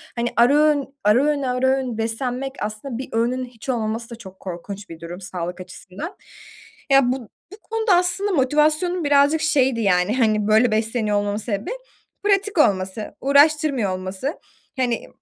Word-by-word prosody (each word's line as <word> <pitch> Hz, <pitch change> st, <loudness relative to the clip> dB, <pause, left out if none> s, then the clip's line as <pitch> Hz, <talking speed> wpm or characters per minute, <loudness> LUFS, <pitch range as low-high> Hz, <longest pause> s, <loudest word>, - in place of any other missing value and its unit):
hani, 235 Hz, 0 st, -1 dB
ara 240 Hz, +4 st, +5 dB
öğün, 295 Hz, -2 st, +2 dB
ara 215 Hz, +6 st, +4 dB
öğün, 295 Hz, -1 st, +1 dB
ara 255 Hz, 0 st, 0 dB
öğün 260 Hz, -3 st, 0 dB
beslenmek 250 Hz, +4 st, -2 dB
aslında 215 Hz, +4 st, -5 dB
bir 260 Hz, -, -6 dB
öğünün 245 Hz, +3 st, 0 dB
hiç 245 Hz, +1 st, -12 dB
olmaması 230 Hz, -1 st, -2 dB
da 235 Hz, -, -7 dB
çok 190 Hz, -5 st, -13 dB
korkunç 195 Hz, +2 st, -7 dB
bir 165 Hz, -1 st, -10 dB
durum 175 Hz, +3 st, -8 dB
sağlık 180 Hz, 0 st, -5 dB
açısından. 190 Hz, -, -9 dB, 0.8 s
Ya 270 Hz, -2 st, +5 dB
bu 255 Hz, -5 st, -5 dB, 0.2 s
bu -, -, -11 dB
konuda 445 Hz, -4 st, +1 dB
aslında 360 Hz, +3 st, +1 dB
motivasyonum 305 Hz, +4 st, +2 dB
birazcık 285 Hz, +2 st, +3 dB
şeydi, 265 Hz, -7 st, +2 dB
yani, 195 Hz, +4 st, +2 dB
hani, 215 Hz, -3 st, +2 dB
böyle 220 Hz, +2 st, +4 dB
besleniyor 220 Hz, -1 st, 0 dB
olmamın 205 Hz, 0 st, -1 dB
sebebi, 215 Hz, -, -3 dB, 0.5 s
pratik 405 Hz, -1 st, +1 dB
olması, 200 Hz, -5 st, +1 dB
uğraştırmıyor 280 Hz, -5 st, +3 dB
olması. 190 Hz, -, -4 dB, 0.4 s
Hani, 245 Hz, -3 st, -1 dB
245 Hz, 155 wpm, -22 LUFS, 210-285 Hz, 0.8 s, ara